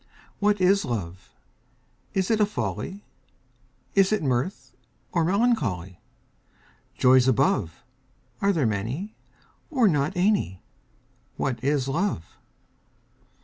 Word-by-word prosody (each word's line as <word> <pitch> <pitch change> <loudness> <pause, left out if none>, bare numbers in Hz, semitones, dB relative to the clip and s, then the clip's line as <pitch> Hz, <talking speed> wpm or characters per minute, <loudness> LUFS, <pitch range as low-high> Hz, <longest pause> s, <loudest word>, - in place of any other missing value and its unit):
WHAT 205 0 +2
is 190 +2 +4
Love? 95 - -5 0.8
Is 190 +2 +1
it 220 - +2
a 210 - +5
folly, 205 -1 -4 0.9
Is 195 0 +4
it 215 -6 +1
mirth, 130 +7 -2 0.4
or 170 - +1
melancholy? 160 - 0 1.0
Joys 130 0 +5
above, 100 -8 +1 0.6
Are 200 - +3
there 160 -9 +1
many, 115 - -2 0.6
or 255 -7 +3
not 150 -1 +1
any? 180 - +1 0.7
What 125 -3 -2
is 140 -1 +1
Love? 140 - -2
155 Hz, 105 wpm, -25 LUFS, 120-200 Hz, 1.0 s, a